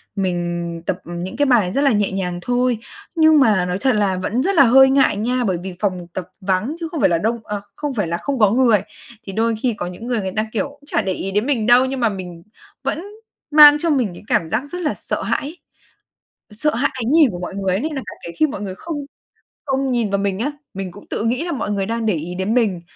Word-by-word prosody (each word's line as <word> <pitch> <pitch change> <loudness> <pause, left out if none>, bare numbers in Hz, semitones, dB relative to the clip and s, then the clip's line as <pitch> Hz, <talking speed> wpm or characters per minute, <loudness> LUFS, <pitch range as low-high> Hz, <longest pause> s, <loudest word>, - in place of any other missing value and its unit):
mình 175 -3 -2
tập - - -1
những 175 +2 -6
cái 290 - +3
bài 225 -9 +3
rất 275 - +1
là 280 -1 +4
nhẹ 205 -3 +1
nhàng 180 -2 -3
thôi, 245 +2 +1 0.4
nhưng 315 -2 +6
mà 210 -8 +4
nói 180 0 -2
thật 265 - +3
là 200 -3 +1
vẫn 220 +7 -1
rất 390 +4 0
là 280 - +8
hơi 265 +2 +7
ngại 270 -6 +3
nha, 245 +4 0
bởi 190 -6 0
vì 185 +2 -7
phòng 185 -4 -2
tập 185 -1 -5
vắng 195 +9 -1
chứ 335 - -3
không 325 - -3
phải - - +4
là 170 - +2
đông 225 +7 -1
ờ, 210 -1 -4
không 295 -2 -3
phải 205 -7 -1
là 170 +1 -1
không 275 +6 -3
có 210 -3 +5
người. 235 -4 +4 0.4
Thì 195 - -7
đôi 225 +2 +1
khi 250 -2 +1
có - - -3
những 180 +6 -8
người 245 -2 0
người 190 -1 -4
ta, 215 0 +1
kiểu, 235 - 0
cũng 285 0 -19
chả - - 0
để 190 - -1
ý 195 +1 -4
đến 210 +3 0
mình 255 -6 0
đâu 245 +2 +6
nhưng 265 0 -3
mà 230 -2 +2
mình 180 -4 -7 0.4
vẫn 320 - -2 0.5
mang 295 -1 +9
trong 315 -3 +1
mình 235 -7 0
cái 175 - -12
cảm 160 - +1
giác 225 - -1
rất 355 +5 -6
là 305 - 0
sợ - - -4
hãi, 310 +4 -2 0.9
sợ 230 +8 0
hãi 265 +5 +1
ánh 250 -1 -2
nhìn 310 -3 +6
của 175 - -6
mọi 180 +2 -6
người 195 -2 -1
ấy 195 - -1
nên 310 +1 -3
là 270 - -3
cả - - -6
kể 170 - -6
khi 310 - +4
mọi 270 - -6
người 190 -2 -5
không 325 - -6 0.7
không 270 -1 0
nhìn 235 -4 0
vào 200 - +2
mình 195 -1 -1
á, 275 +6 -1 0.2
mình 190 -1 -5
cũng 205 +3 -14
tự - - -2
nghĩ 250 +8 0
là 350 - -3
mọi 240 -8 -2
người 200 -1 -1
đang 230 +2 -2
để 215 - +2
ý 165 +3 -5
đến 190 +4 -1
mình. 215 -8 +1
220 Hz, 265 wpm, -20 LUFS, 190-270 Hz, 0.9 s, mang